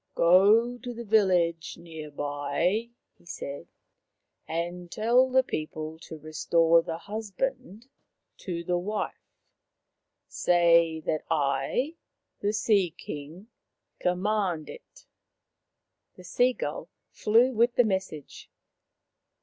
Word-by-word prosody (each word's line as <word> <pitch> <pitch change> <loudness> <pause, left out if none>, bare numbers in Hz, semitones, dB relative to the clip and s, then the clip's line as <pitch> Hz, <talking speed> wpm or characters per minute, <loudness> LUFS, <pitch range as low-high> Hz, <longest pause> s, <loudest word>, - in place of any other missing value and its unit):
" - - -47
Go 210 +8 +5
to 245 +1 -6
the 235 - -6
village 180 -6 +2
near 160 -3 -9
by," 145 +9 -1 0.3
he - - -24
said, 140 -4 -7 0.4
" - - -55
and 175 +2 -4
tell 240 +4 +3
the 260 0 +4
people 155 -4 -5
to 160 - -10
restore 165 +2 +2
the 165 0 -5
husband 220 +4 -5 0.5
to 170 -3 -5
the 175 +1 0
wife. 210 +4 -5 0.8
Say 170 -2 +3
that 155 0 -2
I, 145 - 0 0.4
the 205 - 0
Sea 205 -5 +1
king, 160 +8 -9 0.5
command 180 -3 -1
it." - - -15 1.1
The 180 - -14
sea 245 +8 +2
gull - - -5 0.2
flew 230 +4 +3
with 235 +2 +2
the 245 - +5
message. 190 -7 -4
180 Hz, 110 wpm, -27 LUFS, 160-220 Hz, 1.1 s, Go